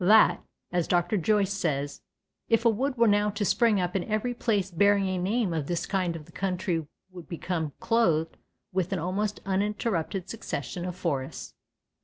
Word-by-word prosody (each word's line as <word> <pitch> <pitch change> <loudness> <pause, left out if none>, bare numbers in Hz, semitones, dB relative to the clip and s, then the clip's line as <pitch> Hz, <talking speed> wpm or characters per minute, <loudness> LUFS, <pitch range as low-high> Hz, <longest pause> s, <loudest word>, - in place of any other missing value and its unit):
that 215 +4 +6 0.3
(as 175 -2 0
Dr. 175 +3 +2
Joyce 200 +1 +2
says) 145 -7 -2 0.5
"if 230 0 +3
a - - +7
wood 260 +4 -1
were 235 0 +5
now 205 0 +3
to 205 0 -2
spring 220 +1 +3
up 180 0 -1
in 190 - +1
every 215 +3 -1
place 205 -5 0
bearing 200 +2 +3
a 185 -1 -1
name 200 +1 0
of 155 -4 -2
this 170 -1 -1
kind 185 -4 0
the 155 -2 -10
country 180 -4 -1 0.2
would 175 -2 -11
become 165 -3 -3
clothed 165 -9 +2 0.4
with 185 -1 0
an 195 - 0
almost 195 +5 -2
uninterrupted 195 -2 -1
succession 175 - -4
of 180 -1 -4
forests." 145 -8 -3
190 Hz, 170 wpm, -28 LUFS, 170-210 Hz, 0.5 s, a